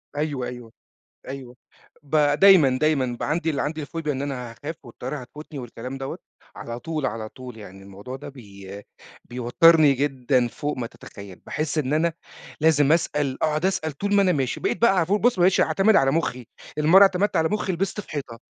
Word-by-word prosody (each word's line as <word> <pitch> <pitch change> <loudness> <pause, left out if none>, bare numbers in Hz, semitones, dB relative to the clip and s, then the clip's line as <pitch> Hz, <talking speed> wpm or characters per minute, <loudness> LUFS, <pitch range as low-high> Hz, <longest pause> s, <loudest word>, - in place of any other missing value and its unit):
أيوه، 145 -4 -2
أيوه، 120 -2 -9 0.6
أيوه 130 -2 -8 0.5
ب 145 +2 -4 0.2
دايمًا، 170 -10 +6
دايمًا، 135 -6 +1
بَقى - - -2
عندي 155 -2 -1
عندي 155 +2 -3
الفوبيا 155 +1 -4
إن 135 - -4
أنا 125 -4 -5
هاخاف، 145 +7 -7
والطيارة 125 +4 -6
هتفوتني، 145 +3 -10
والكلام 125 +2 -7
دوّة، 135 0 -5 0.4
على 120 0 -7
طول 155 -1 -3
على 110 -3 -4
طول، 125 -1 -11
يعني 95 -2 -12
الموضوع 100 +6 -9
ده 135 - -9
بي 100 -6 -11 0.4
بيَوتّرني 140 +5 +4
جدًا 130 -2 0
فوق 145 +4 -4
ما 120 -2 -3
تتخيل، 100 -4 -12
باحس 155 0 -3
إن 145 -2 0
أنا 165 +2 +1 0.5
لازم 150 -2 +4
أسأل 150 -5 0
أقعد 155 +2 +1
أسأل 185 -5 -1
طول 200 +8 -1
ما 200 - +5
أنا 190 -2 +3
ماشي، 135 -6 -1
بقيت - - -2
بَقى 235 -4 +5
علي 175 - +3
طول 200 +4 0
بُص 245 -3 +3
ما - - 0
بقيتش 185 +1 +4
أعتمد 195 +6 +3
على 135 0 +4
مُخّي، 125 -7 -2 0.3
لأن 150 - 0
مرة 190 +5 +8
اعتمدت 195 0 +3
على 160 0 +2
مُخّي 210 -2 -1
لبست 195 +4 -2
في - - -20
حيطة. 135 -6 -6
145 Hz, 190 wpm, -24 LUFS, 125-165 Hz, 0.6 s, مرة